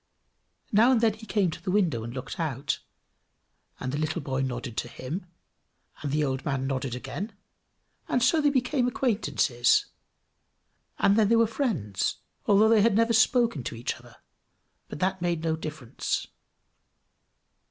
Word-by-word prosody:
Now 225 +5 +5
and 250 - +4
then 225 -2 +3
he 220 +1 -12
came 195 -4 +1
to - - -8
the - - -4
window 180 - +1
and 115 - -6
looked 130 +5 -6
out, 145 -3 -1 1.0
and 130 - -3
the 145 - -2
little 155 0 -1
boy 135 -1 -2
nodded 125 -2 -3
to - - -1
him, 160 +10 -6 0.7
and 145 - -3
the 150 +1 +1
old 135 -2 -1
man 135 -3 -1
nodded 135 -2 -2
again, 195 - -5 0.7
and 245 - +1
so 310 +5 +4
they 290 - +4
became 255 -1 +1
acquaintances, 145 - +2 1.1
and 200 +1 +4
then 210 -2 +4
they 230 - +5
were 230 0 +5
friends, 210 - -1 0.3
although 205 +2 +6
they 225 -2 +5
had 220 -1 +4
never 230 +1 +3
spoken 230 - +3
to - - -4
each 115 +2 -2
other 120 -1 -16 0.7
but - - -7
that 190 0 0
made 170 -2 -1
no 160 -1 +1
difference. 155 -6 -3
170 Hz, 160 wpm, -27 LUFS, 130-225 Hz, 1.1 s, although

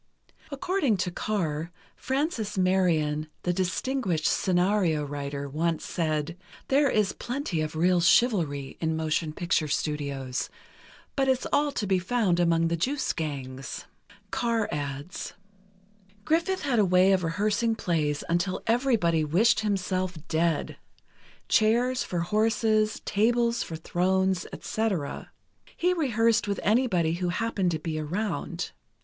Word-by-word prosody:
According 285 - 0
to 180 -1 -1
Carr, 170 -5 -2 0.2
Frances 265 - -2
Marion, 165 -5 +2 0.2
the 180 - +1
distinguished 185 - -1
scenario 180 -4 +2
writer, 140 0 -4
once 160 +3 -1
said: 155 0 -2 0.3
"There 280 +1 +4
is 210 -4 +1
plenty 245 - -3
of 155 0 -3
real 175 +2 +3
chivalry 165 - +2
in 160 -1 0
motion 155 0 -1
picture 165 -1 0
studios, 140 -3 -2 0.7
but 270 -1 +1
it's 260 -1 +1
all 290 0 +3
to 210 - -2
be 190 -1 +2
found 185 -2 +1
among 165 -1 +3
the 170 - 0
juice 265 - -1
gangs." 135 -4 -5 0.5
Carr 230 +1 0
adds: 145 +3 -5 0.9
Griffith 340 +4 +1
had 260 -5 +1
a - - +5
way 185 +1 +4
of 190 -2 +2
rehearsing 210 +7 +1
plays 155 -8 -1
until 175 +3 -1
everybody 225 - +2
wished 180 +10 +3
himself 185 -3 -1
dead—chairs 215 - -1
for 175 -2 -2
horses—tables 220 +3 +1
for 165 - -4
thrones, 185 +2 0
etc. 195 -10 -3 0.5
He 360 +1 +2
rehearsed 230 -9 +2
with 200 -1 -1
anybody 205 -8 +2
who 175 +1 -1
happened 205 -1 0
to 165 - -1
be 155 0 -3
around. 175 +1 -3
185 Hz, 120 wpm, -27 LUFS, 160-225 Hz, 0.9 s, a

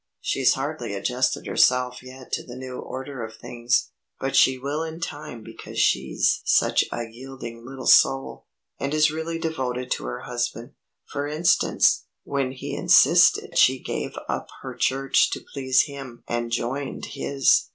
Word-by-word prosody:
"She's - - +2
hardly 100 - -4
adjusted 125 +6 0
herself 125 0 +2
yet 130 0 -12
to - - -1
the 120 - -10
new 130 0 -7
order 130 -1 -6
of 110 0 -8
things, 120 +2 -1 0.3
but 135 0 -2
she 130 0 +5
will 140 +4 -3
in 160 0 -5
time 145 -8 -6
because - - -10
she's 65 +1 +2
such - - +3
a 120 - -3
yielding 120 -1 -9
little 130 +1 -8
soul, 135 0 +4 0.3
and 140 +2 -2
is 155 0 +4
really 160 +1 -3
devoted 130 -6 -3
to - - -1
her 125 - -5
husband. 120 -1 -4 0.3
For 145 0 -4
instance, 155 +3 +2 0.2
when 135 -2 -1
he 130 - -6
insisted - - +5
she 130 +1 +5
gave - - -5
up - - -3 0.2
her - - -6
church 135 0 +2
to - - -6
please 130 -2 +3
him 135 -5 -9
and 120 0 -2
joined 125 +4 -3
his. 135 -2 +2
130 Hz, 155 wpm, -24 LUFS, 120-140 Hz, 0.3 s, she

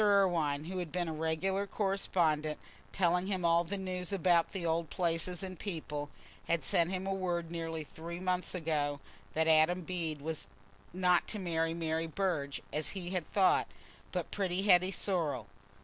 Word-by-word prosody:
Irwine, 175 -8 +3
who 185 +3 -4
had 175 -4 -4
been 175 +1 -1
a 160 - -2
regular 160 +6 0
correspondent, 170 -7 +1 0.3
telling 180 0 +2
him 190 -3 -1
all 170 0 +5
the 200 +4 -3
news 185 -1 -3
about 175 -3 +3
the 190 -4 -4
old 165 0 0
places 175 0 0
and 185 -3 -6
people, 150 -6 -4 0.4
had 170 -3 +1
sent 170 +5 +2
him 185 0 -2
word 180 -3 -1
nearly 165 -2 -3
three 170 +3 -7
months 185 0 -1
ago 150 -4 0 0.4
that 160 0 +3
Adam 160 +3 +5
Bede 165 -3 -3
was 160 +2 -3 0.4
not 180 -1 +3
to 215 - -1
marry 165 -3 0
Mary 165 0 -1
Burge, 160 -5 -1
as 155 0 -1
he 175 -1 -4
had 180 -4 -1
thought, 195 -2 +3 0.4
but - - -3
pretty 190 -2 0
Hetty 185 -2 +6
Sorrel. 165 - 0
170 Hz, 165 wpm, -33 LUFS, 160-185 Hz, 0.4 s, Hetty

